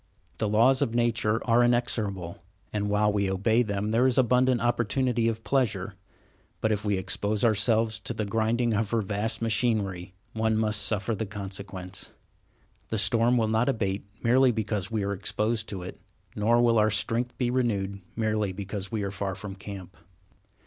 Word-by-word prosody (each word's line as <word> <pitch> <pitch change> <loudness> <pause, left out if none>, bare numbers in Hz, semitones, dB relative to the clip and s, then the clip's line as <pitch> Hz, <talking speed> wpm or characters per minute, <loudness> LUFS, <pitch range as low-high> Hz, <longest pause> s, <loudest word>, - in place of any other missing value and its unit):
The 110 - 0
laws 120 +5 +4
of 115 - 0
nature 115 -2 +1
are 120 +1 +5
inexorable, 110 -7 -1 0.3
and 105 -1 -1
while 105 0 +2
we 100 -2 +1
obey 110 +5 +2
them 105 -2 -2
there 120 +3 +4
is 130 - +1
abundant 125 0 +3
opportunity 120 0 +1
of 110 -1 -2
pleasure, 105 -8 0 0.7
but 110 - +1
if 105 -1 0
we 105 -2 +1
expose 105 +3 0
ourselves 110 +1 +2
to 120 - -4
the 110 - -2
grinding 115 +3 +1
of 105 0 0
her 115 -1 +1
vast 105 +3 -2
machinery, 105 -6 0 0.2
one 110 0 +1
must 105 -1 +1
suffer 100 +2 -1
the 110 0 -3
consequence. 95 -2 -6 0.8
The 110 - -1
storm 115 +4 +3
will 110 -2 +2
not 110 +4 +2
abate 100 -6 -2 0.2
merely 125 +2 +5
because 110 -4 -2
we 110 -3 -1
are 100 0 -1
exposed 110 +3 -1
to 95 -3 -5
it, 90 - -9 0.3
nor 115 +3 +3
will 115 -2 +4
our 105 0 +4
strength 115 +3 -1
be 125 -2 0
renewed 100 -6 -1
merely 110 -3 0
because 100 0 -5
we 110 -3 -2
are 100 - -3
far 95 -1 -3
from 100 0 -7
camp. 95 -1 -9
110 Hz, 170 wpm, -27 LUFS, 100-115 Hz, 0.8 s, are